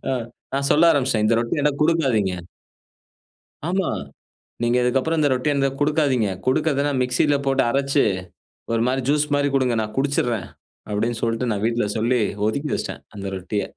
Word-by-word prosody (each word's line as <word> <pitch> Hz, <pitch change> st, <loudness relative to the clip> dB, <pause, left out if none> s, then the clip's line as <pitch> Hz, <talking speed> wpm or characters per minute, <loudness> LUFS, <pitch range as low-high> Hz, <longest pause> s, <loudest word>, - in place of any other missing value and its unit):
ஆ, -, -, +1 dB, 0.4 s
நான் 140 Hz, 0 st, 0 dB
சொல்ல 165 Hz, +2 st, +6 dB
ஆரம்பிச்சுட்டேன். 130 Hz, -8 st, +1 dB
இந்த 115 Hz, -, +3 dB
ரொட்டி 120 Hz, +5 st, -1 dB
எனக்கு 145 Hz, 0 st, 0 dB
குடுக்காதீங்க. 135 Hz, -, +2 dB, 1.3 s
ஆமா, 185 Hz, +1 st, 0 dB, 0.7 s
நீங்க 120 Hz, +1 st, +2 dB
இதுக்கு 125 Hz, +2 st, +2 dB
அப்புறம் 160 Hz, +4 st, -1 dB
இந்த 145 Hz, -, +3 dB
ரொட்டிய 130 Hz, +3 st, +1 dB
எந் 135 Hz, 0 st, 0 dB
குடுக்காதீங்க. 145 Hz, -7 st, +2 dB, 0.2 s
குடுக்கறதுன்னா, 145 Hz, +1 st, +1 dB
மிக்ஸில 125 Hz, +4 st, +2 dB
போட்டு 135 Hz, 0 st, +3 dB
அரச்சு, 140 Hz, +2 st, +2 dB, 0.7 s
ஒரு 115 Hz, 0 st, +1 dB
மாரி 130 Hz, +1 st, 0 dB
ஜூஸ் 150 Hz, 0 st, +2 dB
மாரி 145 Hz, 0 st, +1 dB
குடுங்க, 125 Hz, -3 st, +2 dB
நான் 110 Hz, 0 st, -7 dB
குடிச்சுடறேன். 125 Hz, -6 st, 0 dB, 0.4 s
அப்டின்னு 115 Hz, +3 st, -1 dB
சொல்ட்டு 115 Hz, +1 st, 0 dB
நான் 105 Hz, 0 st, -2 dB
வீட்ல 115 Hz, -1 st, +1 dB
சொல்லி 120 Hz, +2 st, +1 dB, 0.3 s
ஒதுக்கி 140 Hz, +7 st, -2 dB
வச்சுட்டேன். -, -, -5 dB
அந்த 100 Hz, -, -7 dB
ரொட்டிய. 95 Hz, +2 st, -3 dB
130 Hz, 155 wpm, -22 LUFS, 115-145 Hz, 1.3 s, சொல்ல